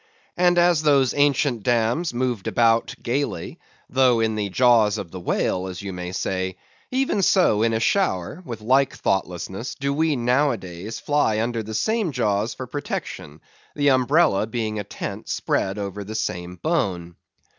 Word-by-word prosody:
And 175 Hz, 0 st, +3 dB
as 175 Hz, -2 st, +4 dB
those 140 Hz, -4 st, +3 dB
ancient 145 Hz, -4 st, +2 dB
dames 120 Hz, -, +1 dB
moved 120 Hz, -4 st, -2 dB
about 115 Hz, -1 st, +2 dB
gaily, 140 Hz, +4 st, -2 dB, 0.3 s
though 125 Hz, -2 st, +3 dB
in 110 Hz, -1 st, +1 dB
the 105 Hz, -2 st, -2 dB
jaws 110 Hz, -1 st, +4 dB
of 90 Hz, -5 st, -6 dB
the 95 Hz, -, -7 dB
whale, 90 Hz, +1 st, -1 dB
as 95 Hz, +1 st, -7 dB
you 100 Hz, -1 st, -5 dB
may 90 Hz, 0 st, -5 dB
say; 95 Hz, 0 st, -2 dB, 0.3 s
even 260 Hz, -5 st, 0 dB
so, 180 Hz, -, +3 dB
in 115 Hz, 0 st, +2 dB
a 110 Hz, -, 0 dB
shower, 155 Hz, -, 0 dB
with 120 Hz, -8 st, -6 dB
the 105 Hz, -, -15 dB
like 135 Hz, +3 st, +3 dB
thoughtlessness, 95 Hz, +4 st, -2 dB
do 140 Hz, +1 st, -2 dB
we 155 Hz, +1 st, +1 dB
nowadays 120 Hz, -6 st, -1 dB
fly 145 Hz, -7 st, +1 dB
under 115 Hz, 0 st, -1 dB
the 110 Hz, 0 st, -6 dB
same 220 Hz, -, 0 dB
jaws 110 Hz, -3 st, 0 dB
for 130 Hz, -, -6 dB
protection; 120 Hz, -, -6 dB, 0.3 s
the 145 Hz, -1 st, +3 dB
umbrella 130 Hz, -4 st, +3 dB
being 110 Hz, -2 st, -3 dB
a -, -, -3 dB
tent -, -, -7 dB
spread 95 Hz, +2 st, -1 dB
over 100 Hz, 0 st, -4 dB
the 110 Hz, +3 st, -7 dB
same 90 Hz, -4 st, -3 dB
bone. 95 Hz, -, -2 dB
115 Hz, 165 wpm, -23 LUFS, 100-140 Hz, 0.3 s, as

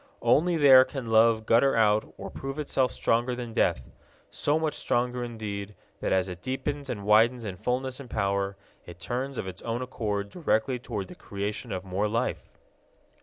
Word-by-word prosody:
Only 170 Hz, +2 st, +3 dB
there 135 Hz, -4 st, +8 dB
can 130 Hz, -3 st, -6 dB
love 110 Hz, 0 st, +4 dB
gutter 125 Hz, +5 st, +4 dB
out 110 Hz, -1 st, +3 dB
or -, -, -7 dB
prove 135 Hz, +1 st, -6 dB
itself 135 Hz, -4 st, +1 dB
stronger 120 Hz, +2 st, 0 dB
than 120 Hz, -2 st, -6 dB
death 65 Hz, -, +1 dB, 0.4 s
so 145 Hz, +2 st, +1 dB
much 160 Hz, -1 st, -1 dB
stronger 125 Hz, 0 st, -1 dB
indeed, 105 Hz, -3 st, -5 dB, 0.2 s
that, -, -, -2 dB
as 95 Hz, 0 st, +2 dB
it 90 Hz, -2 st, -7 dB
deepens 140 Hz, +3 st, -3 dB
and 100 Hz, -5 st, -4 dB
widens 115 Hz, +3 st, +4 dB
in 95 Hz, -3 st, -4 dB
fullness 125 Hz, +6 st, -2 dB
and 135 Hz, -3 st, -10 dB
power, 100 Hz, -2 st, -1 dB, 0.3 s
it 85 Hz, 0 st, -11 dB
turns 130 Hz, +6 st, -4 dB
of -, -, -3 dB
its 95 Hz, 0 st, -8 dB
own 120 Hz, +2 st, -3 dB
accord 105 Hz, -5 st, -3 dB
directly 130 Hz, -6 st, 0 dB
toward 100 Hz, -5 st, -5 dB
the -, -, -10 dB
creation 105 Hz, +4 st, -5 dB
of 95 Hz, 0 st, -4 dB
more 95 Hz, +3 st, -1 dB
life. 115 Hz, +2 st, -2 dB
115 Hz, 175 wpm, -27 LUFS, 100-130 Hz, 0.4 s, there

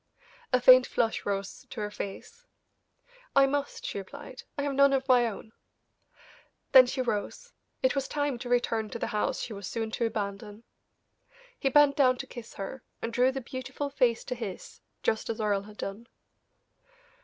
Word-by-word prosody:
A 255 Hz, -, +4 dB
faint 255 Hz, 0 st, +8 dB
flush 225 Hz, -3 st, -1 dB
rose 195 Hz, -1 st, -3 dB
to 240 Hz, -, -7 dB
her 210 Hz, 0 st, -3 dB
face. 465 Hz, -, -8 dB, 0.9 s
"I 275 Hz, 0 st, +7 dB
must," 285 Hz, +1 st, -2 dB
she -, -, -3 dB
replied, 255 Hz, +6 st, -10 dB, 0.2 s
"I 280 Hz, -, -1 dB
have 285 Hz, -1 st, -1 dB
none 280 Hz, 0 st, +5 dB
of 265 Hz, 0 st, 0 dB
my 245 Hz, -2 st, +5 dB
own." 220 Hz, 0 st, -7 dB, 1.2 s
Then 255 Hz, -1 st, +9 dB
she 260 Hz, +1 st, -1 dB
rose; 255 Hz, -, -3 dB, 0.3 s
it 260 Hz, -, +4 dB
was 275 Hz, -1 st, -1 dB
time 290 Hz, -4 st, -1 dB
to 245 Hz, -, -6 dB
return 230 Hz, -3 st, +1 dB
to -, -, -5 dB
the -, -, -2 dB
house 210 Hz, -, 0 dB
she 230 Hz, -, -5 dB
was 200 Hz, -3 st, -7 dB
so 230 Hz, -, -3 dB
soon 220 Hz, 0 st, -3 dB
to 230 Hz, +1 st, 0 dB
abandon. 205 Hz, 0 st, -5 dB, 1.0 s
He 270 Hz, -, +1 dB
bent 290 Hz, +1 st, +5 dB
down 255 Hz, -3 st, +4 dB
to -, -, -5 dB
kiss 240 Hz, -2 st, -10 dB
her, 200 Hz, +7 st, -6 dB, 0.2 s
and 230 Hz, -, -4 dB
drew 255 Hz, +1 st, +4 dB
the 270 Hz, 0 st, -4 dB
beautiful 260 Hz, +3 st, -5 dB
face 245 Hz, -4 st, +2 dB
to -, -, -4 dB
his, 225 Hz, -6 st, -7 dB, 0.2 s
just 220 Hz, -, 0 dB
as 230 Hz, -, -3 dB
Earle 205 Hz, -2 st, +1 dB
had 210 Hz, -, -14 dB
done. 210 Hz, +4 st, -6 dB
245 Hz, 180 wpm, -29 LUFS, 215-270 Hz, 1.2 s, Then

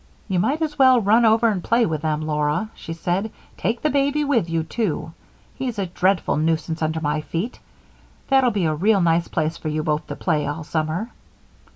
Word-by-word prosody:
"You 190 Hz, -4 st, 0 dB
might 290 Hz, -, +1 dB
as 300 Hz, -2 st, -4 dB
well 260 Hz, -2 st, +7 dB
run 225 Hz, +3 st, +4 dB
over 225 Hz, +1 st, +4 dB
and 190 Hz, -5 st, -2 dB
play 230 Hz, 0 st, +3 dB
with 155 Hz, -3 st, -2 dB
them, 155 Hz, -1 st, -1 dB
Laura," 150 Hz, +7 st, -1 dB
she -, -, -9 dB
said. 180 Hz, +6 st, -1 dB, 0.3 s
"Take 230 Hz, +1 st, -2 dB
the 305 Hz, -, +2 dB
baby 285 Hz, +1 st, +1 dB
with 240 Hz, -, +1 dB
you, 165 Hz, -1 st, 0 dB
too. 165 Hz, -2 st, -3 dB, 0.4 s
He's 250 Hz, -4 st, -4 dB
a 200 Hz, -, -1 dB
dreadful 185 Hz, 0 st, +1 dB
nuisance 160 Hz, +1 st, -1 dB
under 160 Hz, 0 st, 0 dB
my 150 Hz, 0 st, 0 dB
feet. 165 Hz, -, -4 dB, 0.7 s
That'll 265 Hz, -2 st, +4 dB
be 200 Hz, -6 st, 0 dB
a 155 Hz, -, +1 dB
real 195 Hz, +6 st, +2 dB
nice 170 Hz, 0 st, +2 dB
place 160 Hz, 0 st, -1 dB
for -, -, -7 dB
you 155 Hz, 0 st, -1 dB
both 150 Hz, -1 st, -1 dB
to -, -, -5 dB
play 155 Hz, -4 st, 0 dB
all 150 Hz, +2 st, -4 dB
summer." 160 Hz, +8 st, -2 dB
175 Hz, 200 wpm, -22 LUFS, 155-230 Hz, 0.7 s, well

